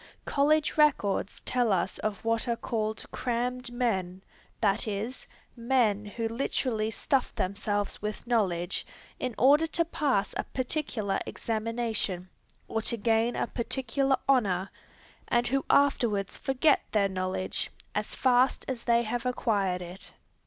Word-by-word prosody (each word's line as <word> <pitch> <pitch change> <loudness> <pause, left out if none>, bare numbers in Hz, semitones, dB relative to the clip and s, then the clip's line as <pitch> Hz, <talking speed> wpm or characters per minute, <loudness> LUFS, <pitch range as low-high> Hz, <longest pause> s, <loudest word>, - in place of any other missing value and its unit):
College 300 +2 +2
records 230 -10 +2
tell 245 -3 +1
us 185 -1 0
of 215 0 -3
what 230 +1 +1
are 235 - +1
called 220 -2 -3
"crammed 245 +1 -2
men," 190 -7 -1 0.4
that 210 0 +1
is, 215 +5 -4 0.3
men 230 -4 +2
who 225 +2 -3
literally 225 -2 -1
stuff 265 +3 0
themselves 205 +1 -2
with 210 0 -4
knowledge 190 -7 0 0.4
in 250 -3 -3
order 290 +5 +5
to 335 +1 +1
pass 275 -11 0
a - - 0
particular 250 -7 -2
examination, 220 -5 -2 0.4
or 225 - -1
to 235 - 0
gain 225 +2 +2
a - - 0
particular 265 +2 0
honor, 195 -8 +2 0.6
and 240 0 +2
who 270 +1 +1
afterwards 230 -8 +2
forget 270 +3 +2
their 205 -2 +4
knowledge, 185 0 -2 0.2
as 210 0 -3
fast 255 0 +3
as 255 -3 -4
they 235 0 +4
have 235 +1 -2
acquired 200 -7 0
it. 180 +3 -9
230 Hz, 130 wpm, -29 LUFS, 205-255 Hz, 0.6 s, order